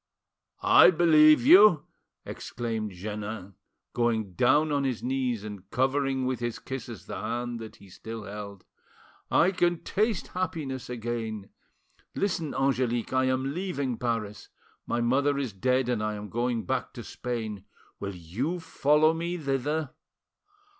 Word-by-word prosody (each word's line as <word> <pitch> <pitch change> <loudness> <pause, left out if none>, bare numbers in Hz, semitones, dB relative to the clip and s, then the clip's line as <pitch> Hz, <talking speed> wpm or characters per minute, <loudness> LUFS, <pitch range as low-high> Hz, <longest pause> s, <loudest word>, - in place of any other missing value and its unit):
"I - - +8
believe 155 +1 +6
you!" 215 - +7 0.4
exclaimed 115 -3 -4
Jeannin, 105 +1 -6 0.4
going 115 -5 0
down 145 - +3
on 140 -1 +1
his 130 -4 -2
knees 125 -4 -1
and 100 -3 -9
covering 135 +1 0
with 130 -1 -1
his 120 -1 -3
kisses 125 -3 -7
the 100 -3 -6
hand 120 -2 -4
he 100 - -17
still 110 +4 -8
held. 100 -2 -8 0.6
"I 180 - +4
can 175 -2 0
taste 215 -2 0
happiness 155 -9 -4
again. 115 -4 -4 0.6
Listen, 170 -6 -1
Angelique. 130 -3 0
I 130 0 +3
am 130 +1 0
leaving 145 -9 -3
Paris; 115 -4 -3 0.4
my 120 - 0
mother 140 +4 +2
is 130 -7 -3
dead, 125 +5 +1
and 120 -3 0
I 110 0 -2
am 105 0 -7
going 120 0 -1
back 130 - -2
to 120 - -8
Spain. 110 -6 -5 0.3
Will 100 -1 -5
you 115 - -3
follow 155 -1 +3
me 170 +2 -3
thither?" 145 0 -1
125 Hz, 135 wpm, -27 LUFS, 110-145 Hz, 0.6 s, I